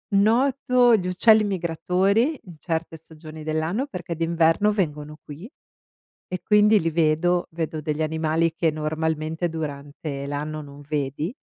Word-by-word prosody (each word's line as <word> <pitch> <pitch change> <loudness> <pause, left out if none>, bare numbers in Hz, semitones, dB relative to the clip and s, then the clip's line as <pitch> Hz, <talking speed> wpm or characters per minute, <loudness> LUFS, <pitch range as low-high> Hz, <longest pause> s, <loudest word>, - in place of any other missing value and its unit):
noto 245 +2 +4
gli 180 -3 -2
uccelli 215 +4 +5
migratori 195 - 0
in 175 -3 -12
certe 165 -1 -3
stagioni 155 0 -12
dell'anno 160 - -1
perché 175 - -6
d'inverno 165 +4 +2
vengono 150 -6 -3
qui 155 +10 -10 0.8
e 185 - -5
quindi 210 0 +4
li 165 - 0
vedo, 165 +2 +1
vedo 160 -1 -4
degli 150 0 -3
animali 160 +1 0
che 165 -1 +1
normalmente 155 +2 -2
durante 145 -2 -6
l'anno 150 +2 -4
non 140 0 -12
vedi, 150 - -2
165 Hz, 130 wpm, -24 LUFS, 155-190 Hz, 0.8 s, uccelli